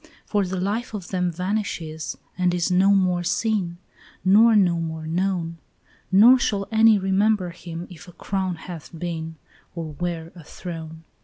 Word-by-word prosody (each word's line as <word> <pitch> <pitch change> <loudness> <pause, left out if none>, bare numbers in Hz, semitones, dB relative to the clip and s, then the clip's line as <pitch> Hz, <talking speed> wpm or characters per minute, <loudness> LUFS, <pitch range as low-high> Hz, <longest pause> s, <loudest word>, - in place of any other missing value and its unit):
"For 205 -3 0
the 185 0 -3
life 215 +5 -2
of 190 -4 -7
them 180 -2 0
vanishes 180 -3 -3 0.2
and 180 -1 +1
is 175 +1 0
no 185 +2 +4
more 185 -3 +3
seen, 185 -2 -1 0.5
Nor 220 +4 +6
no 180 -5 +4
more 160 -1 -4
known; 170 0 -1 0.5
Nor 230 +7 +7
shall 200 -6 -1
any 220 -1 +6
remember 195 -1 +1
him 170 0 -8
if 180 0 -13
a - - -11
crown 190 -1 -2
hath 165 -1 -9
been, 160 -1 -4 0.4
Or 160 -3 -5
where 170 -2 -3
a 170 - -12
throne. 160 -1 -8
180 Hz, 155 wpm, -23 LUFS, 170-200 Hz, 0.5 s, Nor